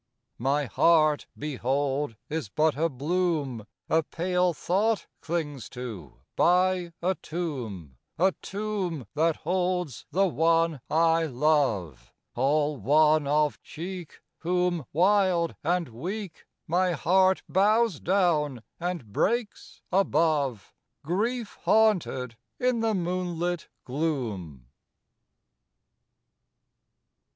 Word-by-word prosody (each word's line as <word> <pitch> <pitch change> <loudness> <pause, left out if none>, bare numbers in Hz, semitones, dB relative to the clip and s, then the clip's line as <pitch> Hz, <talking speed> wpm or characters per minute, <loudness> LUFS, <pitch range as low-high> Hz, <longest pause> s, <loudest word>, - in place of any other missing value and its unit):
IV - - -53
My 140 +3 +1
heart, 155 +2 +3
behold, 140 -1 -1
is 155 -8 -3
but 155 +7 +2
a 165 +3 +1
bloom 145 - -1 0.2
A 160 - +3
pale 180 +3 0
thought 200 +7 0
clings 150 -6 -3
to 115 - -8
by 180 0 +3
a 185 +2 +2
tomb, 125 - -5 0.2
A 190 +3 +4
tomb 195 - -3
that 160 +1 +2
holds 180 - -2
the 195 +2 +2
one 165 -2 +2
I 165 0 +3
love, 125 - 0 0.2
All 145 +3 +1
wan 150 +5 +4
of 150 +1 +1
cheek, 175 0 -8 0.2
Whom, 175 -3 0
wild 185 0 +3
and 170 -1 0
weak, 180 - -6 0.2
My 180 +2 +1
heart 185 +4 +3
bows 210 -1 +3
down 155 - +1 0.2
and 170 - -4
breaks 230 - -1
above, 155 - +1 0.3
Grief 220 - -2
haunted 180 - +2 0.2
in 250 -1 +1
the 225 -1 +1
moonlit 175 -1 -2 0.2
gloom. 115 - -3
165 Hz, 100 wpm, -27 LUFS, 140-180 Hz, 0.3 s, A